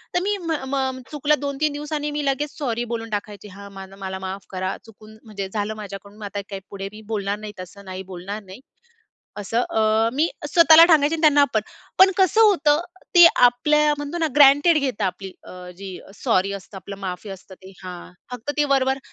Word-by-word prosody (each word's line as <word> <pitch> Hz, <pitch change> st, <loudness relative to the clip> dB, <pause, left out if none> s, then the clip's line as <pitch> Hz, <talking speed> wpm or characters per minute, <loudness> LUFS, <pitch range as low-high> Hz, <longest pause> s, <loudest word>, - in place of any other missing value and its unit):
तर -, -, +4 dB
मी 410 Hz, +1 st, 0 dB
म 335 Hz, -3 st, -5 dB, 0.2 s
म 265 Hz, -1 st, -2 dB
चुकलं 300 Hz, 0 st, +1 dB
2-3 285 Hz, +1 st, -1 dB
दिवस 295 Hz, +1 st, -6 dB
आणि 295 Hz, 0 st, -2 dB
मी 295 Hz, 0 st, -3 dB
लगेच 280 Hz, +2 st, -2 dB
सॉरी 240 Hz, -5 st, -2 dB
बोलून 225 Hz, 0 st, -5 dB
टाकायचे. 205 Hz, 0 st, -5 dB
हा 200 Hz, +1 st, -11 dB
माझ 195 Hz, -1 st, -10 dB
मला 190 Hz, -1 st, -5 dB
माफ 190 Hz, +1 st, -6 dB
करा 185 Hz, 0 st, -3 dB
चुकून 220 Hz, -1 st, -16 dB
म्हणजे 200 Hz, -3 st, -6 dB
झालं 210 Hz, 0 st, -2 dB
माझ्याकडून 200 Hz, -1 st, -10 dB
मग 215 Hz, -, -8 dB
आता 200 Hz, 0 st, -5 dB
काय 195 Hz, -1 st, -5 dB
पुढे 195 Hz, 0 st, -6 dB
मी 215 Hz, -, -11 dB
बोलणार 200 Hz, -1 st, -2 dB
नाही 215 Hz, -1 st, -8 dB
तसं, 190 Hz, +2 st, -11 dB
नाही 185 Hz, 0 st, -7 dB
बोलणार 195 Hz, +4 st, -6 dB
नाही. 190 Hz, +4 st, -12 dB, 0.8 s
असं 215 Hz, +3 st, -1 dB
अ, 220 Hz, +1 st, +2 dB
मी 310 Hz, +5 st, +2 dB, 0.2 s
स्वतःला 330 Hz, +1 st, +7 dB
सांगायचे 315 Hz, -2 st, +3 dB
त्यांना 295 Hz, -2 st, +5 dB
आपण. 240 Hz, -6 st, +1 dB, 0.4 s
पण 380 Hz, +1 st, +8 dB
कसं 385 Hz, +3 st, +3 dB
होतं, 320 Hz, -8 st, +4 dB, 0.3 s
ते 345 Hz, -1 st, +9 dB
आपल्या 300 Hz, +5 st, +4 dB
म्हणतो 290 Hz, +4 st, -5 dB
ना, 325 Hz, -, +1 dB
ग्रँटेड 290 Hz, +3 st, +6 dB
घेता 255 Hz, -8 st, -1 dB
आपली 190 Hz, +1 st, -6 dB
अ, -, -, -12 dB, 0.3 s
जी 190 Hz, -1 st, -8 dB, 0.2 s
सॉरी 200 Hz, -5 st, 0 dB
असतं, 195 Hz, 0 st, -9 dB
आपलं 195 Hz, +2 st, -8 dB
माफी 190 Hz, +2 st, -6 dB
असतं 190 Hz, 0 st, -11 dB
ते 190 Hz, -, -13 dB
हां, 180 Hz, -1 st, -9 dB, 0.2 s
फक्त 250 Hz, +3 st, -5 dB
ते 295 Hz, -, +4 dB
वरवर 265 Hz, -1 st, +2 dB
225 Hz, 195 wpm, -22 LUFS, 195-295 Hz, 0.8 s, ते